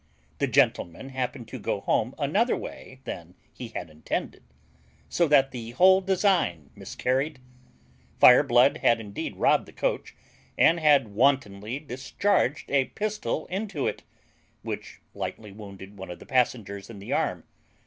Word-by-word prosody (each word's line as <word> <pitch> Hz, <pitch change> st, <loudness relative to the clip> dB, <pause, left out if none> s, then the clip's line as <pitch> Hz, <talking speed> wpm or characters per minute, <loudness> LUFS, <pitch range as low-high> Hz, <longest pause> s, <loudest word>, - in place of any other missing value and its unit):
The -, -, +1 dB
gentleman 85 Hz, +11 st, +1 dB
happened 130 Hz, -2 st, -4 dB
to 130 Hz, -, -7 dB
go 100 Hz, -1 st, -2 dB
home 120 Hz, +5 st, 0 dB
another 195 Hz, -, +1 dB
way 130 Hz, 0 st, -9 dB
than 85 Hz, -4 st, -8 dB, 0.2 s
he 125 Hz, -, -7 dB
had 115 Hz, -, -6 dB
intended; 80 Hz, 0 st, -5 dB, 0.7 s
so 170 Hz, -, +1 dB
that 135 Hz, -2 st, +4 dB
the 115 Hz, -3 st, -7 dB
whole 190 Hz, +1 st, +6 dB
design 185 Hz, -, +1 dB
miscarried. 135 Hz, +4 st, -2 dB, 0.8 s
Fireblood -, -, +6 dB
had 115 Hz, -, +3 dB
indeed 105 Hz, -2 st, -6 dB
robbed -, -, +2 dB
the -, -, -13 dB
coach, -, -, -2 dB, 0.4 s
and 170 Hz, +1 st, +5 dB
had 145 Hz, -7 st, +4 dB
wantonly 110 Hz, -1 st, +1 dB
discharged 145 Hz, +3 st, -1 dB
a 140 Hz, -2 st, +3 dB
pistol 210 Hz, -, -3 dB
into 195 Hz, -6 st, -3 dB
it, -, -, -2 dB, 0.6 s
which -, -, -7 dB
lightly 105 Hz, -2 st, -6 dB
wounded 100 Hz, -1 st, -11 dB
one 95 Hz, -, -8 dB
of 90 Hz, -, -7 dB
the -, -, -14 dB
passengers 115 Hz, -6 st, -1 dB
in 115 Hz, -, -9 dB
the 100 Hz, -, -5 dB
arm. -, -, -1 dB
130 Hz, 140 wpm, -26 LUFS, 100-150 Hz, 0.8 s, whole